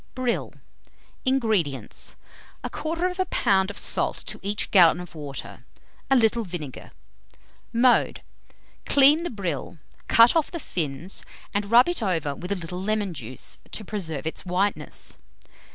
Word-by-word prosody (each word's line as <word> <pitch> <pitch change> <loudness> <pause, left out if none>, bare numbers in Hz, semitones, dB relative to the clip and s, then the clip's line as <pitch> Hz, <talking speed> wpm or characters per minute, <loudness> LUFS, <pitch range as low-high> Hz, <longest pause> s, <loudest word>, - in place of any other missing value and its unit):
BRILL. 250 -2 -1 0.7
230. - - +3
INGREDIENTS. 215 - 0 0.5
1/4 315 +1 -3 0.3
lb. 195 - +2
of 205 - -7
salt - - 0
to - - -5
each 205 +2 -3
gallon 175 -3 +7
of 180 -2 -9
water; 145 -4 -7 0.5
a 270 - +5
little 230 -1 +3
vinegar. 165 - -7 0.8
Mode. 245 +1 +3 0.6
Clean 285 +3 +7
the 345 - -3
brill, 175 - -4 0.3
cut 230 +5 +7
off 320 -3 +2
the 340 - -5
fins, 165 - -4 0.3
and 205 0 -1
rub 240 +5 +7
it 350 -6 -1
over 165 -8 0
with 180 +6 -7
a - - +2
little 180 0 -6
lemon 205 -2 -1
juice, 130 -4 -9
to 215 - -6
preserve 160 -9 -4
its 160 - -3
whiteness. 185 +3 -1
200 Hz, 135 wpm, -25 LUFS, 165-235 Hz, 0.8 s, gallon